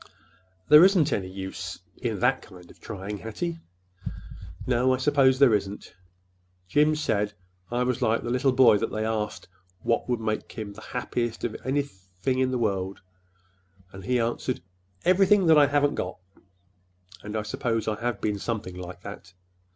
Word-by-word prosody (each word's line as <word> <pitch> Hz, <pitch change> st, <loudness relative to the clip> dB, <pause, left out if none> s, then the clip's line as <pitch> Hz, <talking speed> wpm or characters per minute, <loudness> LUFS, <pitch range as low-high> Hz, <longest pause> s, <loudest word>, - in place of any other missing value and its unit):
"There 150 Hz, +2 st, +9 dB
isn't 180 Hz, -6 st, +4 dB
any 95 Hz, -2 st, -2 dB
use—in 95 Hz, +2 st, -6 dB
that 130 Hz, +2 st, +3 dB
kind 90 Hz, -3 st, -14 dB
of -, -, -20 dB
trying, 105 Hz, -1 st, -6 dB
Hattie." 165 Hz, +10 st, -4 dB, 1.1 s
"No, 125 Hz, +1 st, +3 dB
I -, -, -4 dB
suppose 130 Hz, -1 st, +4 dB
there 135 Hz, -4 st, +6 dB
isn't. 100 Hz, -1 st, -2 dB, 0.7 s
Jim 150 Hz, +10 st, +3 dB
said 105 Hz, -8 st, 0 dB, 0.4 s
I 120 Hz, +1 st, 0 dB
was 125 Hz, -1 st, -1 dB
like 110 Hz, +1 st, +1 dB
the 120 Hz, -, -3 dB
little 130 Hz, +2 st, +2 dB
boy 120 Hz, -5 st, +6 dB
that 115 Hz, -, -2 dB
they 110 Hz, 0 st, -2 dB
asked 110 Hz, -1 st, -3 dB, 0.4 s
what 115 Hz, -, 0 dB
would 120 Hz, -2 st, +1 dB
make 110 Hz, -1 st, -3 dB
him 105 Hz, -2 st, -6 dB
the -, -, -12 dB
happiest 120 Hz, -2 st, -3 dB
of 115 Hz, -, -2 dB
anything 130 Hz, -4 st, -2 dB
in 130 Hz, 0 st, +2 dB
the 130 Hz, -, -1 dB
world, 100 Hz, -4 st, -1 dB, 0.9 s
and 95 Hz, 0 st, -10 dB
he 125 Hz, +4 st, +1 dB
answered, 120 Hz, -2 st, -2 dB, 0.4 s
'Everything 190 Hz, +2 st, +5 dB
that 160 Hz, -2 st, +6 dB
I 145 Hz, -, +6 dB
haven't 145 Hz, +1 st, +2 dB
got.' 90 Hz, -, -4 dB, 1.0 s
And 105 Hz, +1 st, -5 dB
I 105 Hz, -, -1 dB
suppose 110 Hz, +1 st, -2 dB
I 110 Hz, 0 st, -2 dB
have 120 Hz, -3 st, -1 dB
been 105 Hz, -1 st, -1 dB
something 105 Hz, -4 st, -3 dB
like 90 Hz, 0 st, -8 dB
that. 90 Hz, -, -9 dB
115 Hz, 160 wpm, -26 LUFS, 100-130 Hz, 1.1 s, There